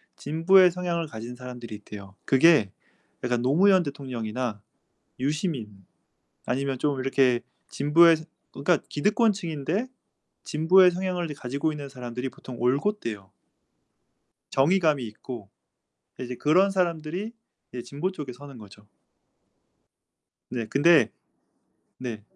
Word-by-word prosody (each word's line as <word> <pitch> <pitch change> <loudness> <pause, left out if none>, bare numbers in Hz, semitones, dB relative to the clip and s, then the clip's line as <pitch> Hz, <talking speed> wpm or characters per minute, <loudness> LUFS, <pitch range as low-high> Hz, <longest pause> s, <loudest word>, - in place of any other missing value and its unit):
진보의 180 +5 +4
성향을 170 -2 -2
가진 115 -1 -8
사람들이 125 -3 -8
있대요. 100 -2 -11
그게 135 - +5 0.5
약간 125 -1 0
노무현 180 +9 +4
대통령이나 125 -6 -4 0.6
유시민 130 - -3 0.6
아니면 135 0 -1
좀 145 -1 0
이렇게 130 -2 +2 0.3
진보에서 160 +3 +4 0.3
그니까 145 +5 +1
기득권 215 +9 +2
층인데 170 - -3 0.6
진보의 180 +4 +5
성향을 180 -2 -2
가지고 140 +4 -2
있는 145 -2 -7
사람들이 125 0 -5
보통 125 -1 -10
올곧대요. 125 - -1 1.2
정의감이 150 -2 +2
있고 110 -1 -9 0.7
이제 125 -1 -5
그런 180 +9 +3
사람들이 180 +2 -2 0.4
이제 125 - -4
진보 150 +10 -4
쪽에 145 -8 -7
서는 140 +1 -12
거죠. 105 -1 -15 1.6
네, 120 -3 -3
근데 145 -3 +5 0.9
네. 120 -4 -6
140 Hz, 265 characters per minute, -26 LUFS, 125-170 Hz, 1.6 s, 그게